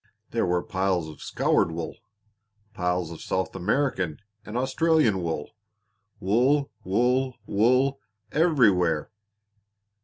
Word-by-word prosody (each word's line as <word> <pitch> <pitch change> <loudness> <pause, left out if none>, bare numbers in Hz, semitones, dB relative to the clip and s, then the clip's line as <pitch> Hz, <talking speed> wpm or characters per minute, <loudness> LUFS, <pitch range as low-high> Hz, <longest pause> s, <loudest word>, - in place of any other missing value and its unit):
There 115 -5 0
were 90 0 +1
piles 95 -5 -1
of 75 - -11
scoured - - +1
wool, 80 0 -5 0.8
piles 90 -3 -1
of 85 - -9
South 95 0 -2
American 95 - 0 0.3
and 105 +3 -5
Australian 130 - +2
wool 80 -3 -3 0.7
wool, 130 +9 +2
wool, 125 +6 +1
wool 130 +6 +2 0.3
everywhere! 105 - +3
105 Hz, 100 wpm, -26 LUFS, 90-130 Hz, 0.8 s, everywhere